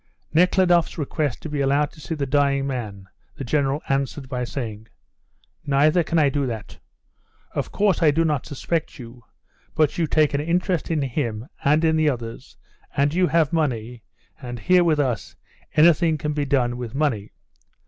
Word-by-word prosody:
Nekhludoff's 175 0 +3
request 150 -2 -2
to 160 - -5
be 145 -1 -2
allowed 140 +2 +2
to 155 - -16
see 160 - -4
the 145 -2 -2
dying 140 0 +1
man 110 -8 -5 0.3
the - - -6
General 140 +2 0
answered 135 0 -2
by 125 -1 -3
saying, 115 -4 -5 0.8
"Neither 150 +4 +3
can 165 - -1
I 150 -3 +5
do 140 -1 -1
that. 115 -3 -7 0.7
Of - - -3
course 200 -3 +1
I 160 - +5
do 165 +3 +2
not 150 -5 -1
suspect 160 +2 -3
you, 120 -1 -11 0.5
but 155 +1 +1
you 165 - +1
take 155 -1 +2
an 140 - 0
interest 175 +2 -1
in 155 -4 0
him 120 -4 -3 0.2
and 150 +3 +3
in 160 0 +3
the 155 -1 +3
others, 115 -4 -6 0.4
and 140 +2 +2
you 180 +1 +3
have 165 -2 +2
money, 120 -7 -1 0.4
and 120 -2 -6
here 180 +9 +4
with 160 -3 +2
us 130 -5 -2 0.4
anything 160 0 +4
can 150 +1 -3
be 145 -1 -1
done 125 -3 +1
with 120 -1 -6
money. 130 -9 -1
145 Hz, 175 wpm, -23 LUFS, 125-160 Hz, 0.8 s, I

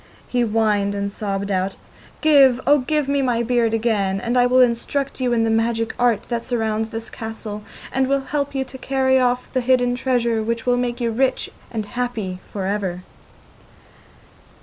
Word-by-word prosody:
He 245 - 0
whined 210 -3 +1
and 200 0 -2
sobbed 200 -1 -3
out: 190 0 0 0.5
'Give, 275 -5 +6
oh 290 +1 +5
give 300 +2 0
me 280 0 +1
my 240 -3 +1
beard 235 -1 +2
again, 215 -4 0
and 235 +4 -2
I 245 0 +5
will 255 +1 +4
instruct 260 +3 +1
you 250 -1 +1
in 235 -1 +2
all - - +2
the - - +1
magic 225 0 0
art 240 -4 +2
that 235 -1 -2
surrounds 220 -3 -1
this 225 0 -6
castle, 220 -2 -6 0.3
and 265 0 +1
will 275 0 +1
help 285 0 -3
you 265 0 0
to 260 - -11
carry 265 -1 +2
off 250 0 0
the 255 - +1
hidden 245 0 +2
treasure, 240 -3 0
which 230 +1 -2
will 245 0 +3
make 245 0 -2
you 235 -1 0
rich 260 +3 0 0.2
and 220 -3 -3
happy 220 -5 -3
for 195 -2 -3
ever. 190 -3 -2
235 Hz, 185 wpm, -21 LUFS, 220-255 Hz, 0.5 s, Give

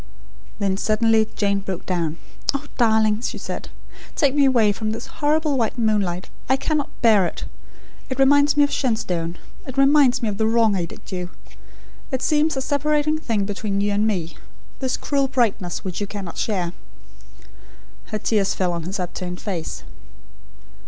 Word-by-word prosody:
Then, 195 -1 0
suddenly, 220 +1 +3
Jane 200 -1 +1
broke 190 -2 -5
down. 170 -3 -1 0.4
"Ah, 280 +1 -3
darling," 220 -2 +3
she - - -3
said, - - -6 0.5
"take 280 -4 +3
me 285 -1 +4
away 235 -6 +4
from 215 +1 -3
this 220 +1 -4 0.2
horrible 300 -2 +2
white 230 +1 0
moonlight! 205 -6 0 0.2
I 265 - +4
cannot 305 +1 -1
bear 210 -6 +5
it. - - -6 0.6
It 260 - -3
reminds 285 +2 +4
me 290 - +7
of 285 - +1
Shenstone. 180 -9 -1 0.3
It 260 0 -7
reminds 275 -3 +5
me - - +1
of 205 0 -5
the 220 - +3
wrong 225 -2 +3
I 175 -3 0
did - - -12
you. 180 -1 -4 0.8
It 260 -1 -2
seems 305 -1 +2
a 265 - -1
separating 300 +2 +1
thing 220 -9 -1
between 200 0 -2
you 205 +1 +1
and 210 +2 +2
me 170 -7 -2 0.4
this 260 -2 -1
cruel 275 -2 0
brightness 220 -9 0
which 185 +1 -4
you 205 - -1
cannot 195 -4 -6
share." 180 -5 -1 1.3
Her 215 - -3
tears 210 -2 +1
fell 185 -2 0
on 170 - -3
his 190 +5 -4
upturned 180 0 -4
fate. 180 -7 -4
220 Hz, 165 wpm, -22 LUFS, 190-265 Hz, 1.3 s, me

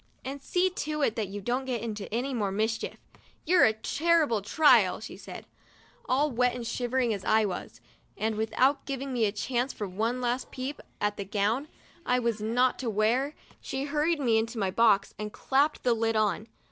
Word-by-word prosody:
And 275 +1 -5
see 365 +6 +1
to 305 -4 -3
it 225 - +1
that 220 -4 -2
you 200 +2 -6
don't 245 +6 -1
get 250 -3 -2
into 215 -3 -5
any 250 +5 -1
more 205 -5 -1
mischief. 220 +3 -2 0.5
You're 355 +2 +6
a 220 - +3
terrible 295 0 +1
trial," 300 +9 +4
she - - -8
said, - - -10 0.6
All 285 +3 +2
wet 245 0 +1
and 240 -1 -5
shivering 245 0 0
as 200 -2 -5
I 220 0 +3
was, 185 -3 -6 0.4
and 220 +1 0
without 235 +6 +1
giving 275 -1 -3
me 235 -3 +2
a 205 - +1
chance 245 +4 -1
for 205 - -4
one 220 +7 -1
last 245 +1 -1
little - - -25
peep 265 +3 -4 0.2
at 205 0 -1
the 200 - -3
gown 210 +8 0 0.4
I 250 - +2
was 235 -3 -1
not 245 +4 +1
to 250 - -2
wear, 230 +7 +1 0.2
she 270 0 -4
hurried 300 +3 0
me 235 -5 +3
into 230 +2 -3
my 195 -3 0
box 215 -2 +3
and 210 0 -4
clapped 280 +7 +1
the 245 - +3
lid 225 0 0
on. 215 0 +1
235 Hz, 195 wpm, -28 LUFS, 215-270 Hz, 0.6 s, You're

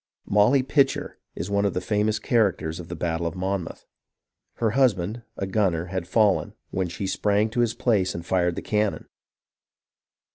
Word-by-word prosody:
" - - -69
Molly 105 +7 +4
Pitcher 135 0 +1
" - - -49
is 90 +5 -5
one 100 0 +2
of 100 - 0
the - - +1
famous 105 +3 0
characters 100 -8 0
of 85 - -8
the 85 - -6
battle 85 -1 -1
of 85 - -5
Monmouth. 95 -1 -3 0.7
Her 115 -2 0
husband, 115 -4 +1 0.2
a 95 - -2
gunner, 95 -4 0
had 95 -2 -3
fallen, 105 0 +2 0.2
when 95 -1 -1
she 90 +3 -5
sprang 105 +2 +1
to 120 - -2
his 120 -2 +2
place 100 -6 +1
and 85 - -6
fired 90 -2 +1
the - - -5
cannon. 105 -1 0
100 Hz, 180 wpm, -25 LUFS, 90-110 Hz, 0.7 s, Molly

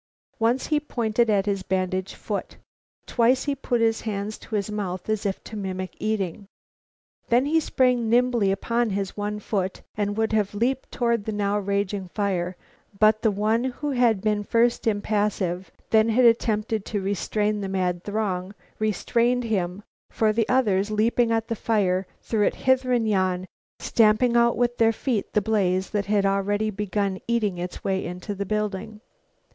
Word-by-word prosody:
Once 235 +3 +2
he 300 - +4
pointed 235 -5 0
at 200 -2 +2
his 200 -2 -1
bandaged 185 0 -2
foot. - - -5 0.5
Twice 250 +2 +2
he 285 - 0
put 245 -3 -1
his 225 0 +2
hands 210 -1 -4
to 220 - -6
his 205 0 -1
mouth, 185 -4 -4
as 215 -1 0
if 195 - -4
to 220 - -9
mimic 185 -2 -4
eating. 205 -3 -2 0.8
Then 245 +3 +4
he 320 +3 +3
sprang 250 -6 +1
nimbly 240 -4 +3
upon 230 +4 0
his 195 -1 -3
one 210 0 -3
foot 195 -3 -3
and 205 0 -1
would 220 0 0
have 210 -1 +1
leaped 255 +5 -1
toward 235 -4 0
the 220 - -2
now 205 0 0
raging 200 -1 -2
fire, 185 -2 -2 0.4
but 215 0 +5
the 225 - +3
one 215 +3 +1
who 285 +3 -3
had 240 -6 +2
been 210 -1 +1
first 235 +2 +1
impassive, 205 -4 0 0.2
then 220 0 +5
had 245 +3 +4
attempted 220 -2 +2
to 210 - -2
restrain 205 +2 -1
the 195 - -3
mad 180 -2 -1
throng, 200 -2 -2 0.2
restrained 235 +4 +1
him, 195 -3 -2 0.3
for 215 -1 +1
the 225 0 0
others, 210 -6 +2
leaping 230 +2 +2
at 225 0 0
the 230 - -2
fire, 195 -4 +1 0.2
threw 220 -2 -1
it - - +1
hither 260 -1 +3
and 235 -3 +2
yon, 185 -3 +1 0.3
stamping 230 +2 +3
out 235 0 +4
with 240 0 +1
their 225 0 +4
feet 230 -4 -2
the 210 - +3
blaze 190 -3 +1
that 205 -2 -1
had 205 -1 +2
already 205 +2 +1
begun 200 -1 -2
eating 215 -6 0
its 180 +1 -6
way 190 -1 0
into 180 +4 -5
the 200 0 -4
building. 210 0 -3
210 Hz, 170 wpm, -25 LUFS, 195-230 Hz, 0.8 s, but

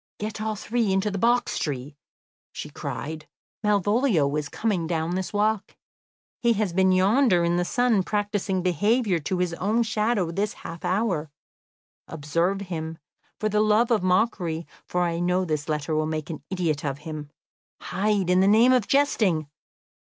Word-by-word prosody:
"Get 215 +1 -5
all 215 0 -1
three 220 0 -1
into 195 +2 +1
the 195 - -3
box 240 +3 +2
tree," 140 -1 -4 0.6
she - - -7
cried; 155 +1 -6 0.4
"Malvolio 205 - +2
is 150 -1 -2
coming 195 -7 -1
down 165 0 -1
this 185 0 -2
walk. 210 0 0 0.6
He 235 -2 +3
has 210 -5 -1
been 190 +1 +3
yonder 190 0 +4
in 170 +1 +1
the 175 - +2
sun 240 -1 +2
practising 205 -2 -1
behaviour 205 - +2
to 180 +5 -2
his 180 -1 0
own 215 +7 +1
shadow 215 -5 0
this 200 +4 -1
half 165 0 -7
hour. 185 -6 0 0.8
Observe 165 +6 -1
him, 165 -4 -5 0.4
for 215 - 0
the 210 0 +2
love 215 +3 +3
of 225 - +3
mockery, 180 -4 0 0.2
for 180 0 0
I 170 -1 -1
know 180 +1 +1
this 155 -1 -3
letter 150 +1 -1
will 155 0 +1
make 155 0 -3
an 155 - -7
idiot 170 -6 -1
of 140 -2 -2
him. 155 -2 -6 0.5
Hide, 195 -2 0
in 180 - +4
the 190 - +4
name 230 +5 +6
of 250 -5 +2
jesting!... 195 - +2
185 Hz, 165 wpm, -25 LUFS, 165-215 Hz, 0.8 s, name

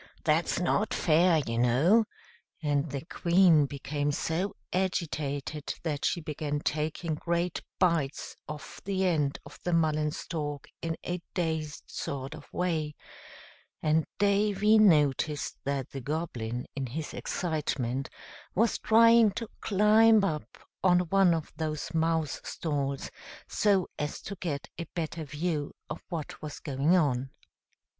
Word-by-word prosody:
That's 160 +2 +2
not 200 +4 +1
fair, 165 -1 +4
you 115 0 -2
know," 150 - +4 0.6
and 145 +1 +1
the 140 +2 -5
Queen 170 -4 +4
became 145 +1 -2
so 170 +6 -1 0.2
agitated 155 -6 -2
that 150 -4 -2
she 175 - +1
began 150 -1 -3
taking 155 +2 -1
great 170 +2 -1 0.2
bites 165 -6 0
off 150 -1 -8
the 190 -1 0
end 150 -6 +1
of - - -12
the 175 - 0
mullen 155 -2 +2
stalk 145 -2 -4
in 165 -1 -2
a 180 0 -2
dazed 160 -4 -2
sort 135 +1 -5
of 155 -2 -12
way; 160 -4 -1 0.9
and 155 0 +2
Davy 205 +1 +4
noticed 150 -6 +3
that 140 -2 -2
the 135 - -5
Goblin, 125 -5 -3
in 135 -2 -2
his 150 +6 -5
excitement, 135 -6 -2 0.5
was 225 +3 +2
trying 230 0 +6
to 230 0 -4
climb 215 +1 +5
up 155 -6 -2 0.3
on 180 -1 +5
one 195 -3 +5
of 160 -1 -5
the 155 -1 -2
mouse 160 -2 0
stalls, 140 -4 -3 0.4
so 195 -4 +2
as 150 0 -3
to 200 - -5
get 150 -6 -3
a 170 - -4
better 160 -1 -3
view 150 0 -2 0.2
of 155 - -5
what 165 -5 -5
was 150 -1 -6
going 145 +3 +2
on. 135 -5 +1
160 Hz, 135 wpm, -29 LUFS, 145-180 Hz, 0.9 s, trying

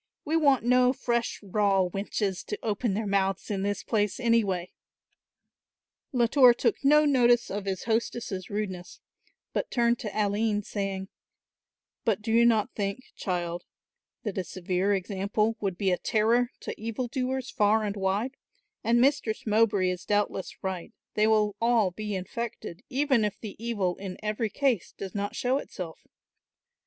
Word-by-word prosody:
We 315 +2 0
want 280 -6 +4
no 250 +1 +4
fresh 235 -3 -1
raw 195 -1 +2
wenches 195 0 -2
to 210 - -3
open 215 -1 0
their 220 +1 -1
mouths 195 0 0
in 195 -2 -1
this 200 0 -2
place, 205 -2 0
anyway." 210 -7 +1 1.4
Latour 250 0 +5
took 235 0 0
no 300 +2 +6
notice 240 -4 +4
of 200 0 -3
his 190 -1 -2
hostess' 225 -4 -2
rudeness, 190 -4 -4 0.5
but - - -1
turned 235 -1 +2
to 215 - -4
Aline 210 0 0
saying, 195 -1 -3 0.9
"But 210 -2 0
do 225 - -2
you 235 +1 +6
not 220 -3 +2
think, 200 +5 -4
child, 175 -2 -3 0.6
that 205 -3 -3
a - - -1
severe 185 +3 -1
example 200 +3 -1
would 195 -4 -2
be 195 -1 +1
a 180 - +1
terror 230 +3 +2
to - - -4
evil 230 +3 -3
doers 260 +1 -2
far 215 +1 +3
and 205 -1 -2
wide, 205 +7 -1 0.5
and 235 +1 +3
Mistress 255 -4 +1
Mowbray 210 -4 +3
is 180 0 -5
doubtless 205 -2 -1
right, 190 -2 -4 0.2
they 215 0 +3
will 210 -2 +3
all 230 -5 +3
be 210 +2 -4
infected, 190 -1 -5
even 270 -3 +2
if 210 -1 -2
the 215 -3 -7
evil 200 -7 -1
in 190 -2 -6
every 215 +1 -1
case 250 -3 0
does 195 -2 -6
not 205 0 -3
show 255 +2 +1
itself. 175 - -8
210 Hz, 155 wpm, -28 LUFS, 195-235 Hz, 1.4 s, no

